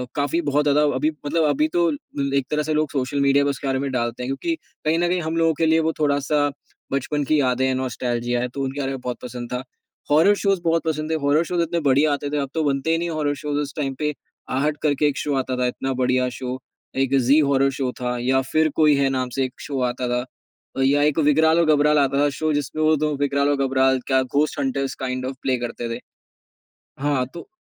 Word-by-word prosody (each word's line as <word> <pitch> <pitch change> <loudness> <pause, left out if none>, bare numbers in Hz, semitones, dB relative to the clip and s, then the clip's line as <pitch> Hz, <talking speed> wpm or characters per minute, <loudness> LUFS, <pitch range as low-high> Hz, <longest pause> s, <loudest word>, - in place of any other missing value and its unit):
काफ़ी 145 +3 0
बहुत 145 -1 +1
ज़्यादा 145 +1 +3
अभी 150 +4 +1
मतलब 160 +3 +1
अभी 150 +2 +2
तो 170 -1 +3 0.3
ल 140 -1 -1
एक 135 -2 0
तरह 150 0 +1
से 155 +1 -1
लोग 155 -1 0
सोशल 135 +1 -1
मीडिया 140 0 +4
में 140 - +1
उसके 140 0 -5
बारे 130 0 0
में 140 0 -2
डालते 120 0 -2
हैं - - -4
क्योंकि 330 - -2 0.3
कहीं 160 +2 +2
न 175 - +2
कहीं 180 -1 0
हम 160 +1 -2
लोग 165 -2 +2
के 165 - +2
लिए 160 0 +4
वो 160 0 +1
थोड़ा-सा 145 0 +1 0.4
बचपन 145 +2 -1
की 155 +2 +2
यादें 130 -1 +1
है 130 - +1
नॉस्टेल्जिया 120 -1 -2
है, 125 - -1
तो 135 +2 -5
उनके 135 +2 -4
बारे 135 -1 -1
में 135 - -4
बहुत 125 -1 -4
पसंद 120 -1 -7
था। 125 +1 -3 0.5
हॉरर 165 +8 +5
शोज़ 195 -3 0
बहुत 165 0 +1
पसंद 155 0 -2
है, 160 - +1
हॉरर 145 +3 +3
शोज़ 175 0 -1
इतने 170 +1 0
बढ़िया 145 +2 +3
आते 145 0 -3
थे, 150 - -2
अब 140 -2 -2
तो 160 -1 0
बनते 140 +2 0
ही 165 - +3
नहीं 170 +1 -2
हॉरर 150 -2 -1
शोज़ 145 -1 -3
उस 145 -1 -5
टाइम 135 -2 -1
पे, 150 -1 0 0.4
आहट 145 +4 0
करके 150 -1 +2
एक 145 - -1
शो 145 -2 -1
आता 130 -1 -2
था 125 0 +1
इतना 135 +2 -3
बढ़िया 125 0 +2
शो 130 0 -4 0.4
एक 135 0 +1
ज़ी 145 +3 +6
हॉरर 135 -2 +3
शो 130 -2 -2
था, 125 0 -1
या 130 +2 +2
फिर 155 0 +3
कोई 150 -2 +5
है, 140 -1 +2
नाम 130 -1 -1
से 135 - +1
एक 130 - -7
शो 140 -2 -4
आता 125 0 -4
था 125 0 0 0.6
अ, - - 0
या 140 +2 +3
एक 150 +1 +2
विग्राल 160 +2 +4
और 155 -2 +4
घबराल 150 +1 +3
आता 140 0 +2
था 145 - +3
शो 155 -1 +1
जिसमें 145 +2 -2
वो 155 0 +4
2 150 0 0
विग्राल 140 0 +1
और 140 -1 +1
घबराल 130 0 +2
क्या 130 -1 +3
ghost 145 +4 0
hunters 135 0 -1
kind 130 0 -3
of 130 +1 -4
play 130 -1 +1
करते 120 0 -4
थे। - - -7 1.0
हाँ 140 -3 +1
तो 175 - -9
140 Hz, 245 wpm, -22 LUFS, 130-155 Hz, 1.0 s, ज़ी